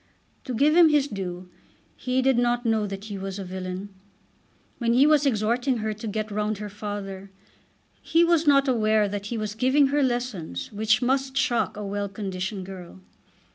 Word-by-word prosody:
To 255 - -4
give 295 +6 +3
him 340 -2 +7
his 295 -2 +3
due, 185 -5 -6 0.5
he 255 +1 -1
did 265 -2 +3
not 240 0 +1
know 220 -2 +1
that 195 0 -6
he 205 -3 -6
was 195 0 -5
a 200 - -5
villain. 185 +1 -6 0.9
When 235 -1 +1
he 260 +4 +5
was 300 -1 +4
exhorting 240 +2 +1
her 215 -1 -2
to 215 +2 -7
"get 215 0 -3
round 210 0 -1
her 210 +1 -6
father" 200 -1 -6 0.7
he 330 +1 +3
was 335 -2 +2
not 275 -1 +5
aware 215 -4 +2
that 205 0 -5
he 235 - -3
was 215 -1 -3
giving 260 +5 +3
her 290 +1 +1
lessons 240 - -2
which 215 +3 +1
must 265 +1 0
shock 260 -6 +1
a 210 - -5
well 200 0 -3
conditioned 190 -1 -4
girl. 180 - -10
215 Hz, 180 wpm, -25 LUFS, 200-260 Hz, 0.9 s, him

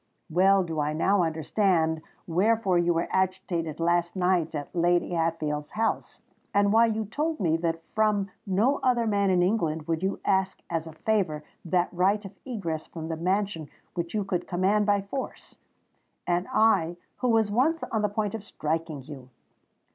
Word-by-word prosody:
well 190 +3 +4
do 165 -3 -4
I 150 +1 0
now 190 +5 +2
understand 160 0 +1 0.2
wherefore 190 +1 +2
you 175 0 +2
were 170 0 0
agitated 185 -4 -1
last 170 +1 +1
night 180 -3 +1
at 145 +4 -6
Lady 175 +1 +2
Hatfield's 160 -3 -1
house—and 205 -2 -1
why 230 +1 +6
you 220 -1 -1
told 305 +9 -2
me 165 -4 +2
that 165 -1 -2
from 210 -2 +1 0.2
no 215 +9 +2
other 245 -2 +2
man 200 -2 +2
in 180 -1 +3
England 165 -6 0
would 165 -1 -1
you 190 +1 -1
ask 190 -1 +1
as 165 -1 -1
a 160 - -9
favour 175 -5 0 0.2
that 175 +1 +1
right 195 +4 +2
of 195 - -7
egress 180 -11 -4
from 160 -1 -7
the 165 - -1
mansion 185 -2 -1 0.2
which 170 +2 -4
you 210 - +1
could 180 -2 -2
command 195 +3 +2
by 200 -1 +3
force! 260 +7 -7 0.7
And 175 +1 0
I, 175 -6 +3 0.2
who 250 - 0
was 220 -3 +3
once 300 +9 +2
on 220 - -1
the 210 - +1
point 205 0 -2
of 220 -3 -5
striking 160 -5 -3
you! 130 -2 -10
185 Hz, 170 wpm, -27 LUFS, 165-205 Hz, 0.7 s, why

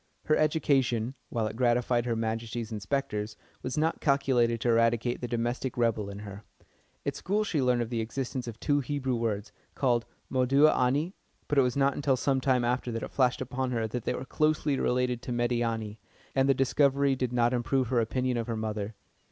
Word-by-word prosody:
Her 155 - +3
education, 135 -6 +1 0.2
while 115 -2 -1
it 110 0 -4
gratified 120 0 +2
Her 115 - 0
Majesty's 115 0 -3
Inspectors, 105 -1 -2 0.2
was 130 +3 -4
not 160 +2 0
calculated 130 -5 +2
to 120 - +1
eradicate 115 +1 +2
the 125 - -2
domestic 120 +2 -2
rebel 115 -4 +1
in 100 - -7
her. 100 +1 -9 0.6
At - - -1
school 205 +3 0
she 165 -8 0
learnt 125 -2 +2
of 115 - -8
the 115 -2 0
existence 125 +2 -4
of 115 -1 -7
two 145 0 +2
Hebrew 135 -2 -1
words, 110 -3 -2 0.2
called 120 -4 +1 0.2
Moudeh 135 +4 +4
anî, 140 +8 +1 0.3
but 145 - +3
it - - +7
was 125 0 0
not 140 0 +2
till 135 -2 +3
some 135 0 +1
time 125 -2 +2
after 125 0 -1
that 115 0 -3
it - - -6
flashed 130 -2 +2
upon 130 +1 -2
her 115 -3 -1
that 120 +1 -5
they - - 0
were 130 - -5
closely 155 0 +1
related 125 -1 0
to 125 - -6
Médiâni, 120 -3 -1 0.4
and 135 0 +2
the 135 - +5
discovery 140 +1 +3
did 125 -2 -2
not 120 0 +2
improve 125 0 0
her 125 -2 +2
opinion 125 +2 -1
of 115 - -2
her 115 -2 -2
mother. 110 -1 -3
125 Hz, 195 wpm, -29 LUFS, 115-135 Hz, 0.6 s, it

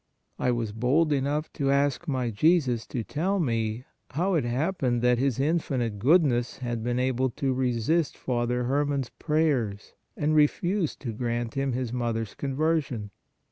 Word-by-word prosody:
I - - +1
was 120 -3 -1
bold 135 +8 +2
enough 145 +3 -1
to 140 -3 -1
ask 140 +3 +1
my 130 -5 -1
Jesus 125 - +2
to 120 - -3
tell 185 - -1
me, 115 -4 -1 0.2
how 180 +7 0
it 155 -8 +1
happened 125 -1 0
that 125 -1 +3
His 135 -2 0
infinite 135 -8 0
Good 160 - +5
ness 120 -2 -1
had 120 -3 -3
been 120 +1 -1
able 130 0 +1
to 130 +2 -1
resist 130 +5 0
Father 125 0 -1
Herman 140 +2 +1
s 120 - -13
pray 155 0 +2
ers 105 -7 -3 0.2
and 150 +1 +1
refuse 165 +4 +2
to 120 -5 -6
grant 120 0 -2
him 135 -1 -1
his 125 -1 -3
mother 120 -2 -1
s 105 - -10
conversion. 140 -6 -1
130 Hz, 170 wpm, -27 LUFS, 120-150 Hz, 0.2 s, Good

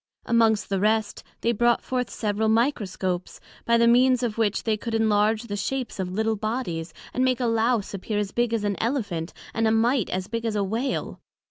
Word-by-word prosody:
Amongst 225 -2 +2
the 195 -1 0
rest, 215 +1 0 0.2
they 235 - +2
brought 235 +1 +2
forth 250 -2 -2
several 215 0 -1
Microscopes, 200 -7 -1 0.3
by 235 0 +4
the 235 0 +4
means 250 +1 +4
of 225 -3 -1
which 210 -3 +1
they 220 -2 +1
could 225 +2 -4
enlarge 220 0 +2
the 210 -3 -5
shapes 250 +3 -3
of 185 -1 -2
little 220 +3 0
bodies, 200 -7 -3 0.2
and 255 - +1
make 255 -1 +2
a 250 - 0
Lowse 230 -2 +1
appear 205 +2 -3
as 205 -1 -1
big 240 -1 0
as 225 -2 0
an 205 -1 -1
Elephant, 205 - -2 0.2
and 225 0 +1
a - - +3
Mite 230 +1 +2
as 185 0 -2
big 230 +1 -3
as 225 -2 -1
a 205 - +1
Whale. 230 +7 -2
220 Hz, 205 wpm, -25 LUFS, 205-235 Hz, 0.3 s, by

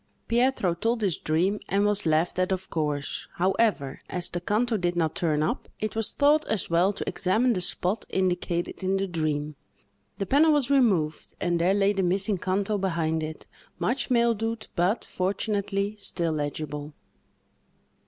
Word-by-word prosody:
Pietro 235 -6 +2
told 225 +7 -1
his 185 -6 +2
dream, 180 +7 0
and 200 +1 +2
was 205 -3 +1
laughed 160 +3 +1
at, 185 +1 +1
of 190 0 -3
course; 150 -3 -2
however, 185 -6 +1
as 180 -1 -2
the 175 - -3
canto 220 +5 +1
did 175 -3 0
not 160 -2 +1
turn 155 -3 0
up, 190 +11 -2
it 215 0 -3
was 225 -1 0
thought 300 +2 +4
as 205 -5 -1
well 175 +4 +4
to 205 - -6
examine 225 +7 +2
the 185 - -1
spot 185 +4 -1
indicated 180 -1 -1
in 190 +1 +1
the 195 - 0
dream. 155 -4 -2 0.6
The 195 - -2
panel 295 - +4
was 280 -3 +1
removed, 190 - +2
and 175 -1 0
there 185 +3 +3
lay 200 0 +3
the 195 - 0
missing 190 +2 +1
canto 200 +3 0
behind 165 -4 0
it; 155 0 -6 0.3
much 225 +12 -1
mildewed, 230 -2 +1
but, 180 +6 +1
fortunately, 200 +1 -1
still 170 -4 -1
legible. 150 0 -4
190 Hz, 165 wpm, -26 LUFS, 170-215 Hz, 0.6 s, thought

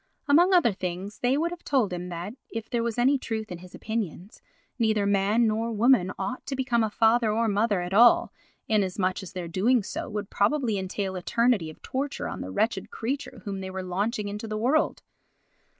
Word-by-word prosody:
Among 340 +6 +5
other 345 -11 +5
things 185 +2 -5
they 250 +3 +2
would 335 +3 0
have 350 -1 -8
told 245 -9 +1
him 180 0 -5
that, 175 +4 -5 0.2
if 225 -1 -5
there 235 - -1
was 230 -1 -2
any 265 +3 +3
truth 220 -4 -4
in 175 - -6
his 180 +1 -12
opinions, 210 -3 -5 0.4
neither 215 -3 +2
man 200 +3 +3
nor 225 +1 0
woman 220 -4 +3
ought 255 - -4
to 275 - -2
become 250 -3 +1
a 220 - 0
father 225 +1 +3
or 230 +2 +1
mother 205 -2 +1
at 175 +1 -4
all, 235 +4 +6 0.3
inasmuch 190 -3 0
as 190 - -10
their 180 -2 -5
doing 210 +7 +2
so 230 - -5
would 210 -2 -5
probably 225 -1 +1
entail 190 0 -3
eternity 230 -1 +1
of 155 - -14
torture 275 +2 -3
on - - -5
the - - -5
wretched 220 - -1
creature 260 -2 -4
whom 200 -2 -4
they 190 - -5
were 190 0 -5
launching 205 +4 -2
into 210 +2 -5
the 215 0 -3
world. 270 +8 +1
215 Hz, 200 wpm, -26 LUFS, 190-240 Hz, 0.4 s, all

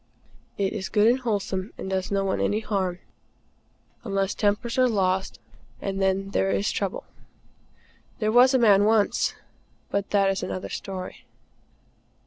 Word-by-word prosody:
It 195 -1 0
is 190 - -4
good 210 0 +3
and 245 +3 +4
wholesome, 205 -4 -2
and - - -6
does 190 -1 -2
no 195 -1 0
one 190 - -1
any 210 +2 +1
harm, 190 -5 -1 1.1
unless 195 -2 -1
tempers 215 +4 0
are 255 - +5
lost; 190 -3 0 0.4
and 195 0 -3
then 195 +1 0
there 195 - +1
is 200 +2 0
trouble. 195 -2 -3 1.1
There 215 -1 0
was 250 +3 +6
a - - +6
man 205 -4 +5
once 215 -1 +2 0.6
but 200 0 -1
that 195 -1 +3
is 195 - -3
another 185 - -4
story. 185 -2 -7
200 Hz, 145 wpm, -25 LUFS, 190-215 Hz, 1.1 s, was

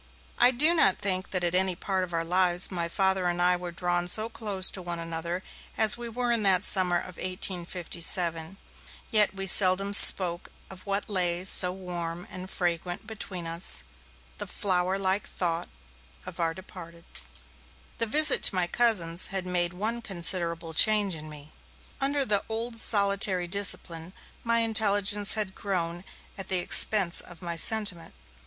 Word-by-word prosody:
I - - +4
do 295 +7 +2
not 195 - +1
think 185 -1 -4
that 185 -2 -4
at 175 0 -3
any 185 0 0
part 190 +1 -4
of 180 - -9
our 165 -1 -4
lives 180 +1 0
my 170 -2 -5
Father 190 0 -2
and 175 0 -4
I 180 0 +1
were 175 0 -9
drawn 175 0 -3
so 215 +5 -2
close 210 -5 -2
to 190 - -6
one 175 -1 -7
another 170 +2 -7 0.3
as 220 -1 +3
we 240 -1 -9
were 245 +1 -4
in 230 -2 -1
that 190 -2 +1
summer 180 -3 +2
of 175 0 -10
1857. 175 -1 -1 0.5
Yet 210 -3 +3
we 195 0 -6
seldom 195 +1 +5
spoke 175 -3 +9 0.2
of 190 +1 -15
what 200 +1 -4
lay 180 -3 -2
so 180 -1 +4
warm 175 -2 -8
and 185 0 -10
fragrant 175 +2 -5
between 200 -5 -9
us, 165 +2 -2 0.6
the - - -7
flower 185 -1 -3
like 195 +1 -3
thought 170 -1 -4 0.6
of 185 -1 -10
our 165 -1 -3
Departed. 170 -3 -14 1.0
The 230 - -1
visit 305 +7 +2
to - - +4
my 180 -1 -1
cousins 175 -5 0
had 190 -2 -4
made 175 -1 -1
one 220 +6 -5
considerable 170 -4 +1
change 210 +2 +1
in 155 -1 -10
me. 150 0 -13 0.5
Under 280 0 -1
the 205 -4 -1
old 230 +1 -6
solitary 200 -4 +1
discipline, 175 -2 -2 0.3
my 230 0 0
intelligence 205 -2 +2
had 210 -3 -2
grown 175 -4 -5 0.4
at 195 - -6
the 185 - +1
expense 180 +1 +1
of 175 0 -16
my 170 -1 -6
sentiment. 190 - -1
185 Hz, 160 wpm, -25 LUFS, 175-205 Hz, 1.0 s, spoke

